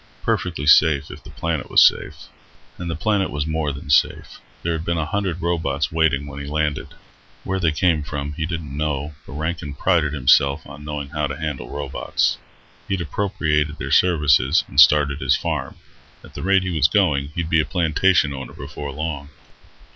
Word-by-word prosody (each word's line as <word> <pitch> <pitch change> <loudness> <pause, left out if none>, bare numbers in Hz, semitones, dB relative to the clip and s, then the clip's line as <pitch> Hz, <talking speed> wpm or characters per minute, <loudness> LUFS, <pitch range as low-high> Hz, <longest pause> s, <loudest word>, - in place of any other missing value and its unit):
Perfectly 85 -6 -1
safe, 75 -1 +4
if - - -11
the - - -12
planet 85 -3 -3
was - - +7
safe. - - 0 0.6
And 85 -1 -5
the 85 - -2
planet 100 +3 0
was 75 0 -3
more 80 -2 -1
than 70 +1 -7
safe. 70 - +1 0.2
There 85 - 0
had 80 0 -3
been 85 0 -1
a 80 - -1
hundred 95 -2 -3
robots 80 -5 -1
waiting 80 -3 +1
when 70 0 -8
he 70 - -7
landed. 75 0 -2 0.5
Where 95 0 -2
they 85 -3 +2
came 80 0 +1
from 75 0 -5
he 80 +2 -3
didn't 80 -5 -5
know, 75 0 -2
but - - -9
Rankin 80 -1 -4
prided 80 -1 +1
himself 70 +1 +3
on 75 - -11
knowing 75 -2 -5
how 75 -1 -2
to 70 +2 -6
handle 75 -6 -5
robots. 70 -2 -1 0.5
He'd 100 -1 -1
appropriated 75 -4 -1
their 65 +1 -5
services 75 -4 +3
and 70 - -1
started 75 0 +5
his - - +3
farm. - - -3 0.5
At - - -15
the - - -7
rate 95 0 +3
he 90 - -3
was 75 -1 +4
going, 70 0 +1
he'd 85 0 -3
be 80 - +4
a - - -1
plantation 80 0 +2
owner 65 0 -8
before 70 -1 -7
long. 70 0 -5
75 Hz, 185 wpm, -21 LUFS, 70-85 Hz, 0.6 s, was